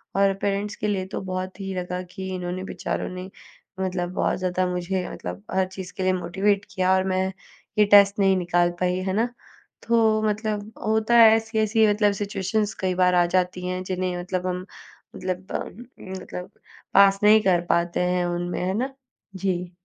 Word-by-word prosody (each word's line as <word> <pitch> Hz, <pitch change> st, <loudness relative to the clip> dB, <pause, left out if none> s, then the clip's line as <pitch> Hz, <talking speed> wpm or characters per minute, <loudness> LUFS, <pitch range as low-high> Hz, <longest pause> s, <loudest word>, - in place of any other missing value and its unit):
और 195 Hz, 0 st, +4 dB
पेरेंट्स 205 Hz, +1 st, -1 dB
के 210 Hz, -, -3 dB
लिए 195 Hz, -2 st, -1 dB
तो -, -, -5 dB
बहुत 185 Hz, +1 st, -4 dB
ही 195 Hz, -1 st, -4 dB
लगा 180 Hz, 0 st, -3 dB
कि, 185 Hz, +1 st, -7 dB
इन्होंने 180 Hz, 0 st, -4 dB
बेचारों -, -, -4 dB
ने 185 Hz, +1 st, -7 dB, 0.5 s
मतलब 180 Hz, -2 st, -2 dB
बहुत -, -, 0 dB
ज़्यादा 185 Hz, 0 st, 0 dB
मुझे 180 Hz, +1 st, -2 dB
मतलब 90 Hz, +3 st, -7 dB
हर 190 Hz, 0 st, +2 dB
चीज़ 185 Hz, -1 st, -8 dB
के 190 Hz, -, -2 dB
लिए 185 Hz, 0 st, +3 dB
मोटिवेट 195 Hz, +3 st, 0 dB
किया, 185 Hz, -1 st, +2 dB
और 190 Hz, -, +2 dB
मैं 185 Hz, 0 st, +1 dB, 0.5 s
ये 210 Hz, -, +6 dB
टेस्ट 200 Hz, 0 st, +6 dB
नहीं 195 Hz, -1 st, +4 dB
निकाल 175 Hz, -1 st, +2 dB
पाई। 180 Hz, 0 st, +1 dB
है -, -, 0 dB
ना? 225 Hz, +4 st, +1 dB, 0.6 s
तो 225 Hz, -2 st, +3 dB
मतलब 210 Hz, 0 st, -3 dB
होता 220 Hz, +2 st, +2 dB
है, 230 Hz, -1 st, +9 dB
ऐसी-ऐसी 220 Hz, -1 st, +2 dB
मतलब 210 Hz, 0 st, +3 dB
सिचुएशन्स 205 Hz, +2 st, -1 dB
कई 185 Hz, -1 st, 0 dB
बार 180 Hz, 0 st, +3 dB
आ 175 Hz, -1 st, +5 dB
जाती 180 Hz, 0 st, 0 dB
हैं, 185 Hz, 0 st, -3 dB
जिन्हें 185 Hz, -1 st, -2 dB
मतलब 180 Hz, +1 st, -3 dB
हम, 180 Hz, 0 st, -3 dB, 0.5 s
मतलब 185 Hz, 0 st, -4 dB
हम 240 Hz, +5 st, -5 dB, 0.4 s
मतलब 180 Hz, 0 st, -7 dB, 0.4 s
पास 195 Hz, 0 st, +6 dB
नहीं 215 Hz, +1 st, +7 dB
कर 185 Hz, -4 st, +3 dB
पाते 170 Hz, 0 st, +1 dB
हैं 180 Hz, 0 st, +1 dB
उनमें, 175 Hz, 0 st, -2 dB
है 190 Hz, -, 0 dB
ना? 265 Hz, +3 st, -2 dB, 0.4 s
जी। 180 Hz, -2 st, -2 dB
185 Hz, 180 wpm, -24 LUFS, 180-205 Hz, 0.6 s, है